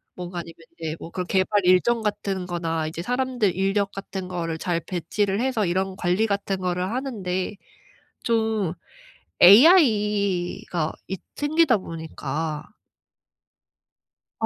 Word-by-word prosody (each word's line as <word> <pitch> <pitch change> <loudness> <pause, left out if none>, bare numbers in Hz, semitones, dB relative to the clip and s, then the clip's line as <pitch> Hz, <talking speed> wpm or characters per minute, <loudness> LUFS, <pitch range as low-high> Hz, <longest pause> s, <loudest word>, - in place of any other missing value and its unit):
뭔가 180 0 -6
아니면 165 -1 -9 0.2
이제 160 -1 -4
뭐 - - -8
그런 180 0 -3
개발 195 +2 +2
일정 220 +6 +3
같은 200 -3 -2
거나 165 -2 -2
이제 160 +2 -5
사람들 245 -3 0
인력 195 +1 0
같은 195 -1 -6
거를 170 -3 -3
잘 170 -1 -1
배치를 195 +5 -1
해서 255 -5 0
이런 190 +2 -1
관리 185 +4 +1
같은 200 -1 -1
거를 180 +1 -2
하는데 210 -7 -3 0.7
좀 220 -5 +1 0.7
AI가 205 - +5 0.2
있 190 -1 -4 0.2
생기다 290 -3 +3
보니까 160 -3 -5 1.8
아 - - 0
190 Hz, 240 characters per minute, -24 LUFS, 175-215 Hz, 1.8 s, AI가